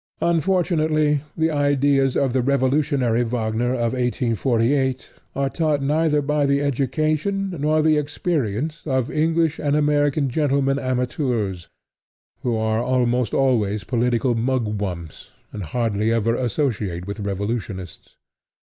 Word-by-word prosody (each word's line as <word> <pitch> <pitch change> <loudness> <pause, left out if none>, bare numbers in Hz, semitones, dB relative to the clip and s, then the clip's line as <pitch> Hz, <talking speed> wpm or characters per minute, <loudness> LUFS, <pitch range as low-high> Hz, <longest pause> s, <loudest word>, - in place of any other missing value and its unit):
Unfortunately, 160 -4 +2 0.2
the 160 0 +1
ideas 140 -2 +2
of 135 -3 +1
the 130 - +2
revolutionary 130 -2 +1
Wagner 115 0 -1
of 120 -1 -1
1848 125 +1 0 0.2
are 140 0 0
taught 155 +1 0
neither 150 +1 +2
by 145 0 +1
the 140 0 +2
education 155 +8 0
nor 155 +2 +2
the 155 -1 +4
experience 150 - -2
of 130 -3 0
English 160 0 +1
and 145 -1 0
American 145 -1 +2
gentlemen 140 0 +1
amateurs, 125 - -2 0.7
who 120 -2 0
are 110 0 0
almost 125 -2 +1
always 110 -6 +1
political 120 +1 +1
mugwumps, 105 - -3 0.2
and 105 - -5
hardly 110 +4 0
ever 115 0 +1
associate 110 - -2
with 100 +2 -6
revolutionists. 100 -2 -5
130 Hz, 115 wpm, -22 LUFS, 115-150 Hz, 0.7 s, the